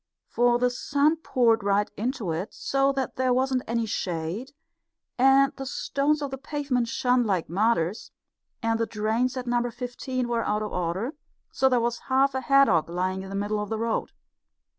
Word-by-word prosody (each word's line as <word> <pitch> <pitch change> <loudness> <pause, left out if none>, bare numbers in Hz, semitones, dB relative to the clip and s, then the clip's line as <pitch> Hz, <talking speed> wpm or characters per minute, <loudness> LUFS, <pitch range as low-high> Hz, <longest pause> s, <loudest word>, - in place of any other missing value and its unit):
For 240 0 +2
the 250 0 +1
sun 285 +5 +1
poured 235 -7 +2
right 205 +1 +2
into 230 -4 -2
it, 175 +6 -4
so 275 0 +1
that 270 -1 -3
there 255 0 +2
wasn't 260 0 +1
any 230 0 0
shade, 180 +5 -3 0.7
and 270 +2 +5
the 270 - -5
stones 290 +2 0
of 280 - -4
the 270 - -5
pavement 275 -4 -1
shone 250 +1 +2
like 190 -7 0
martyrs, 200 0 0 0.5
and 225 0 +1
the 230 - 0
drains 225 +4 -1
at 250 - -4
Number 240 0 0
Fifteen 250 +1 -4
were 235 -1 0
out 210 +1 0
of 210 - -5
order, 180 - -2 0.5
and 265 0 +5
there 250 - +4
was 235 0 -1
half 270 +1 +3
a 260 - -2
haddock 275 - +4
lying 185 +2 -2
in 190 - -8
the 195 - -5
middle 205 +1 -1
of 210 -1 -4
the 220 - -2
road. 230 0 -1
240 Hz, 185 wpm, -26 LUFS, 210-265 Hz, 0.7 s, and